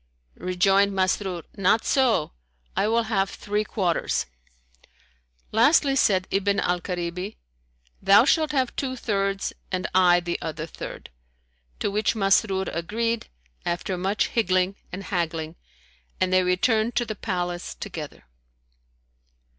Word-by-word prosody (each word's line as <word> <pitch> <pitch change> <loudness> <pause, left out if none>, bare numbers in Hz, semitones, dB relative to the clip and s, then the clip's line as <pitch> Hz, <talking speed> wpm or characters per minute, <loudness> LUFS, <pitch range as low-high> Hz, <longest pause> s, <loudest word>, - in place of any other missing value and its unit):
Rejoined 195 +3 +3
Masrur, 185 -2 0
"Not 200 +2 +2
so, 245 - +2 0.4
I - - +2
will 230 +1 +2
have 195 -3 0
three 210 +1 -2
quarters." 185 -6 -1 1.3
Lastly 275 +4 +4
said 190 -7 +3
Ibn 200 0 +1
al 180 -2 0
Karibi, 180 +2 -4 0.6
"Thou 195 +4 +6
shalt 310 0 +3
have 260 -4 0
two 260 -2 -2
thirds 195 -4 -1 0.2
and 185 -1 -1
I 180 -1 +5
the 175 0 -3
other 155 -1 -4
third;" 165 - -9 0.7
to - - 0
which 215 +3 +1
Masrur 195 -1 +2
agreed, 225 +7 -2 0.4
after 175 +2 -2
much 190 +3 0
higgling 185 -3 +1 0.2
and 190 +2 -6
haggling, 165 -4 -2 0.6
and 185 0 +1
they 185 - +5
returned 215 +6 +1
to 240 - +1
the 215 - -4
palace 180 -4 -3
together. 150 -3 -7
195 Hz, 125 wpm, -25 LUFS, 180-220 Hz, 1.3 s, Thou